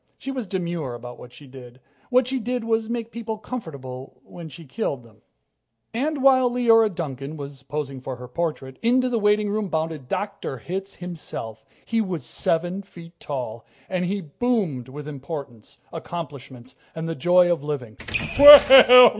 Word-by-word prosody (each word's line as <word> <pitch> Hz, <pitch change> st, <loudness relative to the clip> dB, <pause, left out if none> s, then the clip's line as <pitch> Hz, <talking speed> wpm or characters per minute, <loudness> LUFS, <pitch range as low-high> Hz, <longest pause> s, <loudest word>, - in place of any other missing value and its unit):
She 270 Hz, -, -6 dB
was 255 Hz, -6 st, -5 dB
demure 170 Hz, -8 st, -3 dB
about 120 Hz, +1 st, -10 dB
what 125 Hz, -, -12 dB
she 135 Hz, +4 st, -15 dB
did. 130 Hz, -2 st, -13 dB, 0.3 s
What 255 Hz, 0 st, +3 dB
she 260 Hz, +1 st, -2 dB
did 245 Hz, +1 st, -3 dB
was 225 Hz, 0 st, -1 dB
make 235 Hz, -1 st, -4 dB
people 225 Hz, -1 st, -5 dB
comfortable 140 Hz, -, -8 dB
while 170 Hz, -2 st, -10 dB
she 160 Hz, +2 st, -12 dB
killed 140 Hz, -, -4 dB
them. 110 Hz, -2 st, -20 dB, 0.8 s
And, 280 Hz, +4 st, -2 dB
while 260 Hz, -2 st, +5 dB
Leora 230 Hz, -3 st, +4 dB
Duncan 140 Hz, -1 st, -5 dB
was 140 Hz, -2 st, -9 dB
posing 140 Hz, -1 st, -5 dB
for 130 Hz, 0 st, -6 dB
her 125 Hz, 0 st, -10 dB
portrait, 135 Hz, -2 st, -4 dB
into 255 Hz, +2 st, +2 dB
the 235 Hz, -2 st, 0 dB
waitingroom 210 Hz, 0 st, +1 dB
bounded 160 Hz, -4 st, -3 dB
Dr. 200 Hz, -5 st, -4 dB
Hitz 190 Hz, -, -6 dB
himself. 150 Hz, -11 st, -8 dB, 0.2 s
He 230 Hz, -1 st, 0 dB
was 185 Hz, -7 st, -4 dB
seven 175 Hz, +4 st, -1 dB
feet 170 Hz, -3 st, -15 dB
tall, 125 Hz, -5 st, -5 dB, 0.2 s
and 185 Hz, -1 st, -2 dB
he 200 Hz, +3 st, -2 dB
boomed 165 Hz, -, -2 dB
with 145 Hz, +2 st, -9 dB
importance, 140 Hz, -5 st, -8 dB, 0.2 s
accomplishments, 140 Hz, -7 st, -8 dB, 0.2 s
and 160 Hz, 0 st, -4 dB
the 165 Hz, -, -2 dB
joy 175 Hz, +3 st, +4 dB
of 165 Hz, -5 st, -1 dB
living. 130 Hz, -8 st, -5 dB
165 Hz, 155 wpm, -23 LUFS, 135-215 Hz, 0.8 s, while